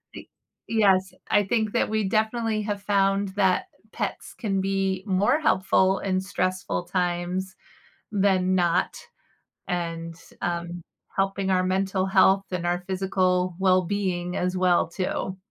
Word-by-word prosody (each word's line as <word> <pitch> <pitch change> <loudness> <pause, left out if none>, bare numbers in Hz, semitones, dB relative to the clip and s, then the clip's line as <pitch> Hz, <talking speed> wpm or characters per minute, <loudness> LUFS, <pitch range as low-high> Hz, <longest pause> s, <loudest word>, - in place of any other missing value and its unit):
Y - - -9 0.4
yes, 190 -4 +3 0.2
I 205 0 +4
think 215 +1 0
that - - +1
we 215 -1 0
definitely 220 +2 0
have 205 -1 -3
found 195 -1 +2
that 190 - +1 0.3
pets - - -4
can 195 -4 -1
be 195 -1 -1
more 205 +10 +2
helpful 190 -6 +2
in 185 -1 -1
stressful 185 -2 -2
times 180 +1 -2 0.6
than 190 -2 +2
not, 175 -1 +1 0.7
and, 165 -2 -3 0.3
um, 175 0 -3 0.3
helping 195 0 0
our 185 -1 +2
mental 190 0 0
health 190 0 +4
and 175 -1 -2
our 175 0 0
physical 185 -1 0
well-being 185 -1 +1
as 180 +1 -1
well, 180 -2 +3
too. 185 +1 -3
190 Hz, 130 wpm, -25 LUFS, 180-195 Hz, 0.7 s, I